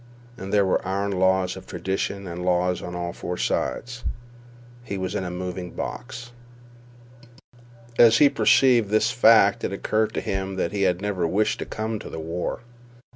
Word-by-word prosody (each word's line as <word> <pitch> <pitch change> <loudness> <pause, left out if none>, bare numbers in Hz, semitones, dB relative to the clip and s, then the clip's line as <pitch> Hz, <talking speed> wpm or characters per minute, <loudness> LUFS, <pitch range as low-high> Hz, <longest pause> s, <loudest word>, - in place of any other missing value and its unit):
And 95 -5 -7
there 100 -1 +4
were 95 - +1
iron 100 +2 -2
laws 95 -1 +1
of 95 - -11
tradition 95 +2 -3
and 90 0 -6
law 90 0 +2
on 90 -1 -5
four 90 0 -5
sides. 120 +5 -2 0.8
He 100 -4 -5
was 95 -1 -3
in - - -2
a 90 - -4
moving 90 0 -5
box. 120 -1 -6 1.7
As 115 -1 +7
he 145 - +7
perceived 130 -5 +4
this 110 +2 +2
fact 110 -4 +5
it - - -1
occurred 110 +2 -1
to - - -1
him 95 0 -3
that 85 -2 -1
he 100 - -2
had 90 +2 -3
never 95 -5 -1
wished 105 +6 0
to - - -4
come 110 0 -3
to - - -9
the 80 - -6
war. 85 +6 -4
95 Hz, 170 wpm, -24 LUFS, 90-110 Hz, 1.7 s, As